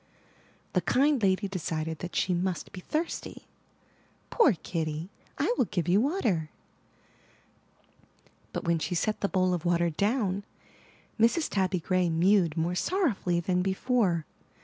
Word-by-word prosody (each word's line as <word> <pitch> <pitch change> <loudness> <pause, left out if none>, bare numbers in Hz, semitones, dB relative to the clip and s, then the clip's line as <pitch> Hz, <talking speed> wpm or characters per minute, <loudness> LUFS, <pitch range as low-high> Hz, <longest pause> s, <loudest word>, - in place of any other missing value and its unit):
The - - +2
kind 280 0 +2
lady 195 0 +2
decided 160 -4 -3
that 180 - -6
she 185 - +1
must 180 0 -2
be 185 - -8
thirsty. 315 - -4 0.9
*Toor 310 - +5
Kitty, 160 0 -4 0.3
I - - +1
will - - +4
give 175 -5 -2
you 190 +4 +4
water/' 230 - 0 2.0
but - - -4
when 170 -1 +1
she 175 - -2
set 215 +5 -1
the 200 - +1
bowl 185 -1 +2
of 175 -2 -2
water 170 -1 +2
down, 200 - 0 0.8
Mrs. 235 +9 +3
Tabby 185 -2 +1
Gray 185 +1 +1
mewed 170 0 +3
more 165 +2 0
sorrowfully 205 - 0
than 180 +1 0
be 190 +1 0
fore. 195 -10 +1
185 Hz, 140 wpm, -28 LUFS, 170-215 Hz, 2.0 s, Toor